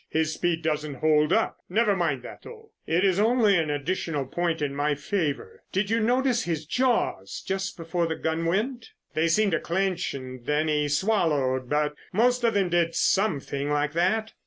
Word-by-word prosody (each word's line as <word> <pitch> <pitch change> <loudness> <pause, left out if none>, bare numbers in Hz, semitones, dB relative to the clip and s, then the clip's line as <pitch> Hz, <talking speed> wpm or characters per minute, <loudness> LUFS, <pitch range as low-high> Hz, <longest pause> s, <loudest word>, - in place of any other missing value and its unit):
His 160 0 0
speed 170 -1 -1
doesn't 150 -2 -2
hold 150 +2 +2
up. 225 +3 +1
Never 210 +1 +2
mind 155 -9 -1
that, - - -10
though, 445 -1 -13 0.2
it 175 +4 +2
is 190 -1 +2
only 220 -2 +4
an 160 -3 +1
additional 150 0 -2
point 170 +4 -1
in 145 -2 -2
my 145 +1 0
favor. 150 0 -3
Did 195 +2 -1
you 225 - +2
notice 245 +2 +2
his 160 -2 -2
jaws 230 - 0
just 190 0 -3
before 170 0 -1
the 160 - -2
gun 160 +1 -2
went?" 225 +8 -2 0.2
"They 160 +1 +1
seemed 200 +5 +2
to 165 - +1
clench 185 -1 -1
and 130 -2 -8
then 150 +1 +1
he 150 -1 +1
swallowed, 145 - +1
but 150 0 +1 0.2
most 245 +5 +2
of 230 -2 +2
them 195 -3 +2
did 170 -1 +1
some 190 -7 +2
thing 140 +1 -4
like 150 0 0
that." 190 +6 0
165 Hz, 185 wpm, -26 LUFS, 150-205 Hz, 0.2 s, only